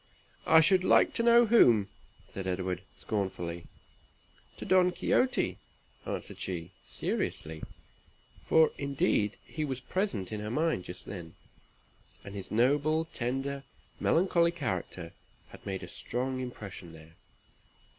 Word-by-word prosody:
"I 160 - +8
should 185 +3 +4
like - - +5
to - - +1
know 235 0 +7
to 235 - +1
whom," 115 - +6 0.5
said 95 -1 -4
Edward, 90 0 -2 0.2
scornfully. 90 -5 -3 0.9
"To - - -7
Don 180 -1 +4
Quixote," 250 +8 +1 0.5
answered - - -5
she, 85 -2 -4
seriously; 80 0 -3 0.9
for, 160 -1 +5
indeed, 135 -6 +1
he 155 - -4
was 135 -4 -3
present 130 - -2
in 105 - -3
her 105 0 -4
mind 155 - 0
just 90 - -8
then, 85 -4 -8 0.9
and 100 - -9
his 100 -2 -5
noble, 145 +7 +2
tender, 135 0 -3 0.4
melancholy 170 -1 +3
character 95 - -4 0.4
had - - -14
made 95 -1 -3
a - - -7
strong 130 +8 -3
impression 100 -9 -7
there. 80 0 -13
120 Hz, 125 wpm, -30 LUFS, -, 0.9 s, I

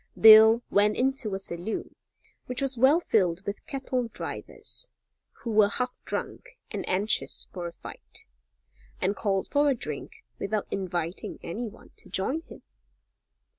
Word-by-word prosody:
Bill 220 +1 +9
went 205 +1 +4
into 255 -6 0
a - - -1
saloon 180 +2 -5 0.5
which 250 0 -3
was 275 -1 +1
well 265 +7 +5
filled 190 - +1
with 200 0 -4
cattle 260 -3 -2
drivers, - - -6 0.5
who 235 - -2
were 210 -1 +6
half 250 +3 -3
drunk - - -5
and - - -3
anxious 200 +4 0
for 175 -2 -4
a - - -6
fight - - -9 0.7
and 200 +2 +1
called 195 -2 0
for 290 0 +4
a 275 - +3
drink 150 - -6 0.2
without 210 +1 -1
inviting 175 -2 -3
any 225 +8 -4
one 210 - -13
to - - -14
join 230 - -1
him. - - -14
215 Hz, 145 wpm, -28 LUFS, 190-250 Hz, 0.7 s, Bill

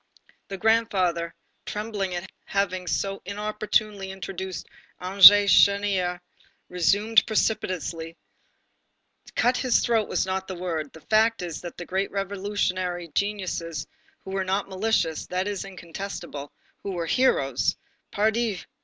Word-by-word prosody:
The 195 - -6
grandfather, 185 -6 +1 0.3
trembling 210 -3 -3
at 175 - -5 0.2
having 185 -2 -1
so 195 0 -1
inopportunely 210 0 -1
introduced 190 0 -6 0.3
André 195 +2 +9
Chénier, 200 -3 +3 0.5
resumed 205 +5 +3
precipitately: 180 -7 -1 1.2
"Cut 250 +1 +3
his 250 -1 +2
throat 225 -3 +1
is - - +1
not 190 0 -3
the 190 - -5
word. 165 -5 -3
The 160 - -14
fact 220 +1 +2
is 170 -3 -5
that 175 -1 -8
the 175 - -6
great 190 +2 -1
revolutionary 190 -3 -2
geniuses, 185 -3 -2 0.4
who 190 - -7
were 195 0 -1
not 190 +2 -1
malicious, 190 -5 0
that 185 +2 -2
is 205 -2 -3
incontestable, 175 -5 -7 0.3
who 200 - -4
were 170 -2 -2
heroes, 150 - +2 0.3
pardi! 220 -2 0
195 Hz, 120 wpm, -25 LUFS, 180-205 Hz, 1.2 s, André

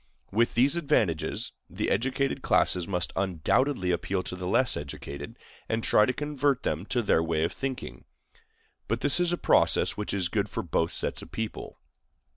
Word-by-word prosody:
With 115 +4 +1
these 135 +7 +4
advantages, 115 - 0 0.2
the - - -2
educated 135 +2 0
classes 90 -2 +2
must 90 -3 -2
undoubtedly 95 - +1
appeal 90 +2 -1
to 90 - -5
the 90 0 -5
less 120 +4 +3
educated, 70 0 -7 0.3
and 110 0 -1
try 105 - +4
to - - +2
convert 145 -1 -1
them 80 +6 -2
to 125 -3 0
their 90 - +3
way 80 -1 0
of 85 - -1
thinking; 135 -1 -5 0.8
but - - -1
this 145 +4 +4
is 175 -1 +2
a 175 - 0
process - - +3
which 105 - -3
is 95 -3 0
good 100 +3 -1
for - - -4
both 80 0 0
sets - - -3
of - - -12
people. 110 -1 -5
105 Hz, 175 wpm, -27 LUFS, 90-135 Hz, 0.8 s, these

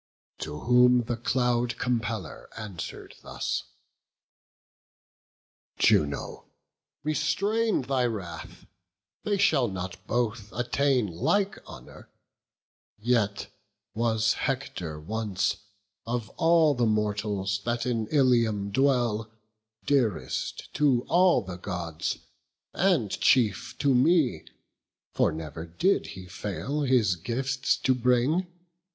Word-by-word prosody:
To 75 0 -6
whom 125 0 +5
the 120 +1 -2
Cloud 120 0 0
compeller 110 - -3
answer'd 100 -6 -7
thus: - - -3 2.2
"Juno, 70 -2 +1 0.6
restrain 200 +7 +1
thy 130 -1 +1
wrath; 90 -8 -7 0.6
they 205 -1 0
shall 150 -10 +3
not 95 -2 -6
both 115 -3 -1
Attain 125 +1 +1
like 195 - 0
honour; - - -12 0.9
yet 105 -2 0 0.5
was 110 0 +1
Hector 90 - -3
once, 105 +3 -1 0.5
Of 120 -3 -2
all 165 0 +4
the 120 -3 +1
mortals 105 -2 -1
that 120 0 -1
in 115 -3 -1
Ilium 115 -7 +2
dwell, 120 -3 +1 0.6
Dearest 125 -9 -1
to 135 -5 +2
all 180 -4 +4
the 95 -2 -7
Gods, 85 -4 -4 0.6
and 170 - +2
chief 110 -8 +2
to 140 -2 +2
me; 140 +2 +3 0.7
For - - +2
never 80 0 -6
did 175 - +1
he 95 - -8
fail 105 +10 -4
his 125 -9 +3
gifts 130 +8 -1
to 130 - +2
bring. 125 +8 +2
120 Hz, 100 wpm, -27 LUFS, 100-135 Hz, 2.2 s, whom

